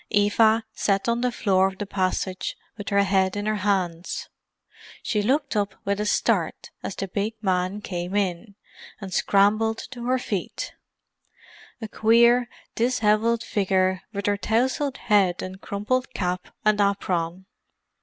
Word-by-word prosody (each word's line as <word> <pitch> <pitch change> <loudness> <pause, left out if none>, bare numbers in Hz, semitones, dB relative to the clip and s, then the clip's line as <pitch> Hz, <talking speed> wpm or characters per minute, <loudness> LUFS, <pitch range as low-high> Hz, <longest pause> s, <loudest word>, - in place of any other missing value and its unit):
Eva 220 +2 +3
sat 195 0 0
on 235 0 +1
the 250 0 +1
floor 190 -4 +2
of 190 0 -6
the 205 - -3
passage 185 -1 -2 0.2
with 205 - -6
her 200 0 +3
head 190 -1 +2
in 205 0 -3
her 215 0 0
hands. 185 -4 -1 0.7
She 210 -3 0
looked 275 +5 0
up 200 -2 0
with 200 +1 0
a 210 - -1
start - - 0
as - - -5
the 195 - -3
big 205 +4 -2
man 185 +1 0
came 180 -1 -4
in, 200 +1 -1 0.4
and 195 -3 -7
scrambled 215 +4 +3
to 240 -3 -7
her 255 +1 +3
feet; 205 -7 -4 1.1
a 220 - -5
queer 235 +3 +4 0.2
dishevelled 230 -1 +2
figure 190 -3 +1
with 200 -2 -4
her 205 0 +2
tousled 255 +6 0
head 195 -5 +2
and 190 +1 -7
crumpled 255 +6 -1
cap 180 -1 -2 0.2
and 210 -1 +4
apron. 185 -3 -1
205 Hz, 145 wpm, -24 LUFS, 190-225 Hz, 1.1 s, queer